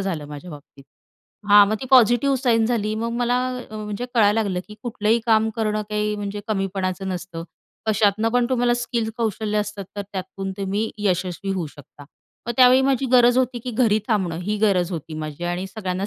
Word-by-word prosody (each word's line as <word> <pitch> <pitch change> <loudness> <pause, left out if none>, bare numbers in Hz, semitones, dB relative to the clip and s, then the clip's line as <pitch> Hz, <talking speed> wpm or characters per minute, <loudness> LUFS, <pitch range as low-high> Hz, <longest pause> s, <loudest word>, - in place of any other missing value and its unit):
झालं 175 -7 -3
माझ्या 150 +4 -9
बाबतीत. 145 -2 -13 0.6
हां 205 0 +8
मग 215 - 0
ती 260 - -5
पॉझिटिव्ह 255 +2 +5
साईन 235 -4 +2
झाली 215 -3 -1
मग 230 +2 -2
मला 245 0 +1 0.3
अ, - - -9
म्हणजे 210 +2 -5
कळायला 215 0 +4
लागलं 190 -4 -2
की 210 - -10
कुठलंही 220 -1 +1
काम 220 -1 +4
करणं 215 -1 0
काही 210 0 -1
म्हणजे 205 0 -4
कमीपणाचं 195 -2 -2
नसतं. 175 -2 -5 0.4
कशातनं 215 +1 +2
पण 245 -1 +3
तुम्हाला 245 -1 +2
स्किल 240 -2 -2
कौशल्य 215 -2 -1
असतात, 205 -1 -4
तर 205 - -2
त्यातून 190 0 -5
तुम्ही 200 +3 -1
यशस्वी 185 -1 -1
होऊ 180 -4 -2
शकता. 145 0 -14 0.4
मग 235 - -1
त्यावेळी 255 0 +7
माझी 270 -1 +1
गरज 245 0 +6
होती 255 -1 0
की 250 - -3
घरी 220 -2 +2
थांबणं 190 -7 0
ही 210 +3 -1
गरज 190 -4 +2
होती 160 -1 -6
माझी 155 +2 -6
आणि 175 +2 -2
सगळ्यांना 190 -1 -4
210 Hz, 185 wpm, -22 LUFS, 190-230 Hz, 0.6 s, हां